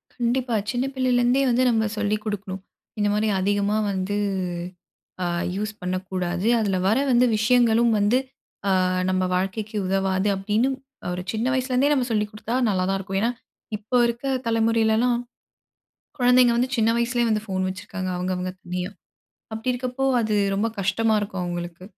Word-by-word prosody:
கண்டிப்பா. 245 Hz, 0 st, 0 dB, 0.2 s
சின்ன 250 Hz, +1 st, -1 dB
பிள்ளையில 255 Hz, -1 st, +2 dB
இருந்தே 245 Hz, +3 st, +3 dB
வந்து 245 Hz, +2 st, +3 dB
நம்ம 220 Hz, -2 st, +2 dB
சொல்லிக் 210 Hz, 0 st, -1 dB
குடுக்கணும். 195 Hz, -3 st, -4 dB, 0.4 s
இந்தமாரி 210 Hz, +1 st, +1 dB
அதிகமா 205 Hz, +1 st, +1 dB, 0.2 s
வந்து 195 Hz, +1 st, -2 dB, 1.1 s
அ -, -, 0 dB, 0.3 s
யூஸ் 210 Hz, +2 st, -2 dB
பண்ணக்கூடாது. 185 Hz, 0 st, -2 dB
அதில 200 Hz, -3 st, 0 dB
வர 215 Hz, +4 st, +3 dB
வந்து 245 Hz, 0 st, +5 dB
விஷயங்களும் 235 Hz, +1 st, +4 dB
வந்து 205 Hz, +5 st, +3 dB, 0.6 s
அ -, -, +2 dB, 0.3 s
நம்ம 185 Hz, 0 st, +1 dB
வாழ்க்கைக்கு 205 Hz, +4 st, -2 dB
உதவாது. 190 Hz, +1 st, +1 dB
அப்பிடின்னும் 215 Hz, +7 st, 0 dB, 0.4 s
ஒரு 180 Hz, 0 st, -4 dB
சின்ன 225 Hz, +3 st, -1 dB
வயசுலேருந்தே 260 Hz, +2 st, +1 dB
நம்ம 255 Hz, -3 st, 0 dB
சொல்லிக் 210 Hz, -1 st, 0 dB
குடுத்தா 215 Hz, +2 st, -5 dB
நல்லா 185 Hz, -3 st, +1 dB
தான் 195 Hz, -, +1 dB
இருக்கும். 195 Hz, 0 st, -3 dB
ஏன்னா, 230 Hz, -, +2 dB, 0.5 s
இப்போ 215 Hz, +4 st, -2 dB
இருக்க 235 Hz, +3 st, -3 dB, 0.2 s
தலைமுறையிலலாம், 230 Hz, +1 st, +2 dB, 1.0 s
குழந்தைங்க 250 Hz, -1 st, +5 dB
வந்து 250 Hz, +2 st, +1 dB
சின்ன 225 Hz, -1 st, +3 dB
வயசுலே 240 Hz, 0 st, +1 dB
வந்து 215 Hz, -1 st, +1 dB
ஃபோன் 185 Hz, -1 st, -1 dB
வச்சுருக்காங்க. 185 Hz, 0 st, -5 dB
அவுங்கவுங்க 180 Hz, 0 st, -2 dB
தனியா. 180 Hz, +1 st, -4 dB, 0.6 s
அப்பிடி 225 Hz, +3 st, -1 dB
இருக்கப்போ 255 Hz, +1 st, -3 dB, 0.2 s
அது 215 Hz, -1 st, 0 dB, 0.2 s
ரொம்ப 205 Hz, +3 st, +1 dB
கஷ்டமா 220 Hz, +4 st, +1 dB
இருக்கும் 195 Hz, -3 st, -4 dB
அவுங்களுக்கு. 175 Hz, 0 st, -5 dB
215 Hz, 145 wpm, -24 LUFS, 195-240 Hz, 1.1 s, வந்து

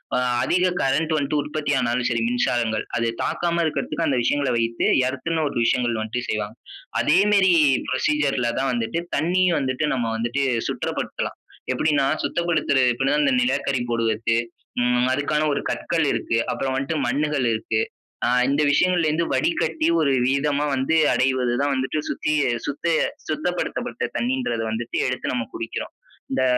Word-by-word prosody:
அ -, -, +2 dB, 0.3 s
அதிக 180 Hz, +1 st, +2 dB
கரண்ட் 155 Hz, +4 st, +1 dB
வந்துட்டு 145 Hz, 0 st, 0 dB
உற்பத்தி 150 Hz, 0 st, -3 dB
ஆனாலும் 120 Hz, 0 st, 0 dB
சரி, 115 Hz, -1 st, 0 dB
மின்சாரங்கள். 120 Hz, -2 st, 0 dB
அது 115 Hz, 0 st, 0 dB, 0.2 s
தாக்காம 170 Hz, -1 st, 0 dB
இருக்கக்கறத்துக்கு 160 Hz, +1 st, -1 dB
அந்த 135 Hz, -4 st, +1 dB
விஷயங்கள 140 Hz, +1 st, +1 dB
வைத்து 115 Hz, 0 st, 0 dB, 0.2 s
எர்த்ன்னு 155 Hz, +4 st, -2 dB
ஒரு -, -, -6 dB
விஷயங்கள் 120 Hz, -2 st, +1 dB
வந்துட்டு 120 Hz, +3 st, -4 dB
செய்வாங்க. 105 Hz, 0 st, -3 dB, 0.5 s
அதே 160 Hz, +5 st, +4 dB
மாரி 190 Hz, -2 st, +5 dB, 0.4 s
புரோசீஜர்‌ல 135 Hz, -2 st, +1 dB
தான் 135 Hz, 0 st, 0 dB
வந்துட்டு 120 Hz, +8 st, -1 dB, 0.2 s
தண்ணி 180 Hz, +3 st, +2 dB, 0.2 s
வந்துட்டு 130 Hz, +2 st, -1 dB
நம்ம 115 Hz, -3 st, -1 dB
வந்துட்டு, 120 Hz, +4 st, -1 dB, 0.2 s
சுத்தப்படுத்தலாம். -, -, -3 dB, 0.4 s
எப்படின்னா, 145 Hz, +1 st, +2 dB, 0.2 s
சுத்தப்படுத்துறது 155 Hz, -7 st, +1 dB
எப்டினா, 135 Hz, +4 st, +1 dB
இந்த -, -, +3 dB
நிலக்கரி 140 Hz, -, 0 dB
போடுவதற்கு 115 Hz, 0 st, +1 dB, 0.4 s
ம் 125 Hz, 0 st, +2 dB
அதுக்கான 145 Hz, +3 st, 0 dB
ஒரு -, -, -1 dB
கற்கள் 165 Hz, -2 st, -1 dB
இருக்கு. 115 Hz, -, -1 dB
அப்பறம் 135 Hz, -1 st, -2 dB
வந்துட்டு 135 Hz, +4 st, -2 dB
மண்ணுகள் 145 Hz, +1 st, 0 dB
இருக்கு. 110 Hz, 0 st, -1 dB, 0.4 s
அ -, -, +2 dB, 0.2 s
இந்த 140 Hz, +2 st, +2 dB
விஷயங்கள்ல 175 Hz, +3 st, +3 dB
இருந்து 160 Hz, +2 st, 0 dB
வடிகட்டி 325 Hz, -1 st, 0 dB
ஒரு 140 Hz, -, +2 dB
விதமா 140 Hz, +2 st, +1 dB
வந்து 135 Hz, +4 st, 0 dB, 0.2 s
அடைவது 130 Hz, -2 st, +1 dB
தான் 145 Hz, 0 st, +1 dB
வந்துட்டு 130 Hz, +3 st, -1 dB
சுத்தி-சுத்த-சுத்தப்படுத்தப்பட்ட 155 Hz, -, -1 dB
தண்ணீன்றது 245 Hz, -, -1 dB
வந்துட்டு 115 Hz, +1 st, -3 dB
எடுத்து 125 Hz, 0 st, -2 dB
நம்ம 120 Hz, -2 st, -1 dB
குடிக்கிறோம். 115 Hz, -, -5 dB, 0.4 s
இந்த 130 Hz, 0 st, +1 dB
135 Hz, 140 wpm, -23 LUFS, 120-155 Hz, 0.5 s, மாரி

